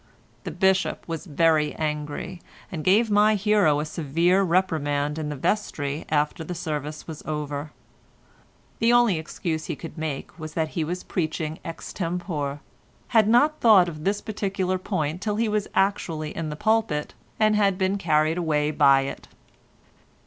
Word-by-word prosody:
The - - -2
Bishop 190 +3 +1
was 165 +2 -5
very 155 -1 +2
angry, 150 +3 -4 0.3
and 160 -4 -4
gave 210 +5 +3
my 210 +1 +5
hero 200 -7 +3
a 150 - -2
severe 165 +5 +1
reprimand 155 -5 0
in 150 -1 -3
the 150 - -4
vestry 145 -3 -2
after 150 +2 -1
service 150 -2 -4
was 160 -2 -8
over; 150 -1 -4 1.1
the 230 +1 +4
only 240 -8 +4
excuse 160 0 -4
he - - -3
could 165 0 -9
make 155 +1 -5
was 155 -1 -7
that 160 -1 0
he 165 - -2
was 175 +4 -4
preaching 160 -2 -3
ex 165 0 -7
tempore, 165 -5 -3 0.5
had 220 -3 +4
not 290 +7 +3
thought 205 -6 +7
of 155 -3 -7
this 200 +3 0
particular 195 -3 -2
point 175 -3 -2
till 210 0 -1
he 225 +1 +1
was 210 -1 0
actually 165 -6 0
in 165 -2 -3
the 150 - -4
pulpit, 215 -5 0 0.3
and 215 -1 +4
had 200 -2 +3
then 190 -1 +1
been 200 - -1
carried 155 0 +2
away 150 -3 +1
by 135 -2 +5
it. 135 - -6
165 Hz, 160 wpm, -25 LUFS, 150-195 Hz, 1.1 s, thought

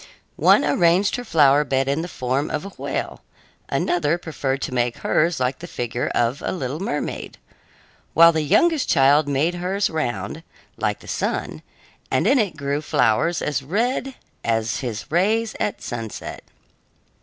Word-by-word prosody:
One - - +5
arranged 175 +3 +3
her 245 - -5
flower 145 - +4
bed 135 -1 0
in 140 +3 0
the 170 - -4
form 130 -1 -2
of 165 - -3
a - - -6
whale; - - -5 0.5
another 170 -1 +1
preferred 140 -5 -3
to - - -4
make 120 -1 0
hers 165 0 +1
like 130 +1 -1
the 175 - -8
figure 120 -4 -3
of 120 +5 +1
a - - -1
little 145 -4 -4
mermaid; 160 -6 -4 0.8
while 165 +1 +8
the 160 -1 0
youngest 315 - +2
child 145 +3 +4
made 145 +5 +1
hers 185 +3 -1
round, 120 - -3 0.3
like - - -2
the - - -14
sun, - - -3 0.5
and - - +1
in 270 - +4
it 195 -8 -1
grew 140 +1 -2
flowers 140 +5 +1
as 145 -3 -1
red 240 - -1 0.3
as 115 0 0
his 120 -5 -4
rays 215 +6 +1
at 210 - -2
sunset. 115 -3 -6
150 Hz, 155 wpm, -22 LUFS, 130-175 Hz, 0.8 s, while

